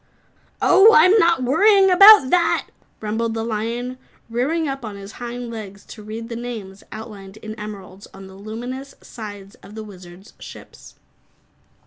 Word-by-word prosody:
"Oh, 430 +3 +6
I'm 365 +6 +6
not 335 -7 +2
worrying 385 - +4
about 395 -6 +8
that!" 355 -2 +2 0.4
rumbled 225 +1 -3
the 225 - -3
lion, 235 +3 -4 0.3
rearing 295 +7 -1
up 270 -2 -5
on 215 -3 -7
his 200 0 -10
hind 240 0 -6
legs 200 -3 -9
to 215 - -12
read 220 +2 -8
the 230 - -7
names 220 -5 -8
outlined 210 -2 -10
in 215 0 -9
emeralds 205 -3 -10
on 195 0 -13
the 190 - -13
luminous 240 +7 -8
sides 205 -3 -10
of 205 - -14
the 220 - -7
Wizard's 185 -1 -14
ships. - - -13
225 Hz, 150 wpm, -20 LUFS, 205-260 Hz, 0.4 s, about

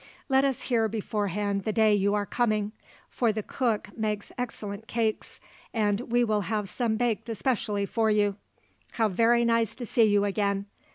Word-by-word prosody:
Let 265 0 +4
us 275 -2 0
hear 230 -3 +2
beforehand 205 -2 -2
the 215 - -1
day 220 -1 +4
you 200 0 +2
are 205 -1 0
coming; 215 -2 0 0.4
for 235 -3 +1
the 215 0 -3
cook 220 -5 -2
makes 210 -2 -3
excellent 220 -3 -5
cakes, 225 -2 -2 0.4
and 215 +2 0
we 240 0 +4
will 215 -3 +1
have 210 +1 -2
some 225 +2 -1
baked 230 -1 -1
specially 210 -5 0
for 220 +2 +1
you. 205 -2 +2 0.6
How 225 -2 +2
very 235 +4 +3
nice 230 -2 +1
to 245 - -6
see 230 0 +3
you 205 -1 +3
again. 200 -1 0
215 Hz, 170 wpm, -27 LUFS, 205-230 Hz, 0.6 s, Let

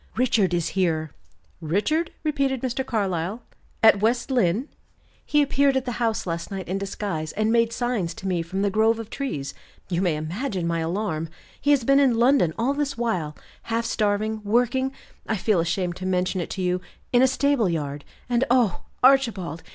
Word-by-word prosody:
"Richard 225 -6 +2
is 175 -2 0
here!" 160 -5 0 0.5
"Richard!" 210 - 0
repeated 275 -4 0
Mr. 260 +1 -1
Carlyle. 200 -3 -2 0.4
"At 220 -3 +6
West 235 +4 +1
Lynne!" 235 - +1 0.6
"He 295 0 +3
appeared 280 -1 +2
at 265 - -2
the 250 - -2
house 225 -2 0
last 170 -1 -3
night 195 -2 -5
in 190 +3 -2
disguise, 195 -5 -4
and 215 +1 +1
made 230 0 +3
signs 230 -9 -2
to 195 - -6
me 180 -3 0
from 190 +4 -3
the 200 - +1
grove 220 +2 +3
of 225 -2 -8
trees. 145 - -4 0.4
You 175 -1 0
may 175 -5 +1
imagine 180 - -3
my 170 0 0
alarm. 165 -1 -2 0.3
He 290 - 0
has 285 -4 +4
been 275 +3 +4
in 260 -5 +3
London 245 - +4
all 245 +5 +1
this 285 -2 -2
while, 180 -11 -2 0.3
half 230 0 0
starving, 215 -1 0
working 245 +5 +1 0.4
I 220 - 0
feel 200 -1 +2
ashamed 175 +1 -1
to 185 - -4
mention 185 0 0
it - - -5
to 190 - -3
you 180 0 0 0.3
in 245 - +6
a 260 - +6
stable 265 -5 +2
yard. 145 -3 -3 0.2
And, 245 0 +2
oh, 240 -7 +2 0.2
Archibald! 230 - +3
215 Hz, 180 wpm, -24 LUFS, 175-250 Hz, 0.6 s, At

